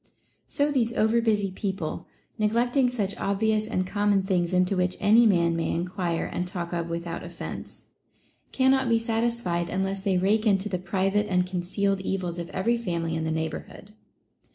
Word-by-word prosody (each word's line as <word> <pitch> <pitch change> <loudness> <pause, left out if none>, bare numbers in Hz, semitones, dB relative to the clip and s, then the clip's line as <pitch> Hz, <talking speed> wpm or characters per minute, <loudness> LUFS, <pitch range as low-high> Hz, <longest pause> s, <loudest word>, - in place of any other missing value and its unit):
So 285 +1 0
these 235 -4 +1
over 225 +1 +2
busy 210 -4 +1
people, 190 -4 -4 0.3
neslectino• 245 +5 +2
such 205 -5 -2
obvious 215 +2 0
and 185 -5 -1
common 205 0 +1
things 180 -3 0
into 185 +1 +2
which 180 0 0
any 220 +3 +6
man 170 -4 +3
may 165 - -1
enquire 175 0 -2
and 180 - -3
talk 175 -2 -5
of 170 -1 -2
without 170 0 -4
offence, - - -8 0.7
cannot 265 -1 +3
be 230 - +4
satisfied 225 -6 -1
unless 195 +1 -1
they 190 -1 +1
rake 210 +4 +2
into 200 0 +2
the 185 -2 -2
private 195 +3 0
and 180 -2 +2
con 180 -1 -3
cealed 195 +2 0
evils 180 -3 -3
of 170 - -5
every 230 +5 0
family 170 -6 -2
in 160 0 -2
the 160 - -1
neighborhood. 160 +6 -5
195 Hz, 170 wpm, -26 LUFS, 180-220 Hz, 0.7 s, any